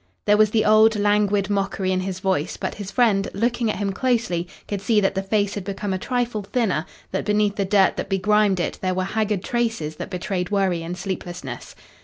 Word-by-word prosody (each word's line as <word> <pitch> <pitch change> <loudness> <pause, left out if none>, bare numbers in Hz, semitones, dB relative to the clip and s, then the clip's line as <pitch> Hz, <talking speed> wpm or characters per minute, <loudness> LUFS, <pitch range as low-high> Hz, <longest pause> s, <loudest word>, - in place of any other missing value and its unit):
There 210 - +5
was 215 0 +5
the 215 +1 +1
old 215 +1 +6
languid 205 -1 +2
mockery 195 -2 -1
in 185 - +1
his 185 0 -4
voice, 185 -5 -1
but - - -3
his 205 -2 -7
friend, 200 -2 +2
looking 235 +1 0
at - - -1
him 200 -1 -1
closely, 220 -7 0 0.2
could 200 -2 -3
see 215 +1 +3
that 195 -1 +1
the 195 - -1
face 200 +1 0
had 205 - -4
become 200 0 -3
a 185 - -2
trifle 245 -1 -1
thinner, 195 -5 -1 0.2
that - - -1
beneath 210 -1 +1
the 200 - 0
dirt 195 0 +3
that - - -4
begrimed 205 0 +2
it 175 - -2
there 185 -1 0
were 185 - 0
haggard 210 0 -1
traces 225 -11 -2
that - - -6
betrayed 180 -1 -3
worry 195 -4 +1
and 170 +2 -5
sleeplessness. 175 -8 -6
200 Hz, 210 wpm, -23 LUFS, 185-215 Hz, 0.2 s, old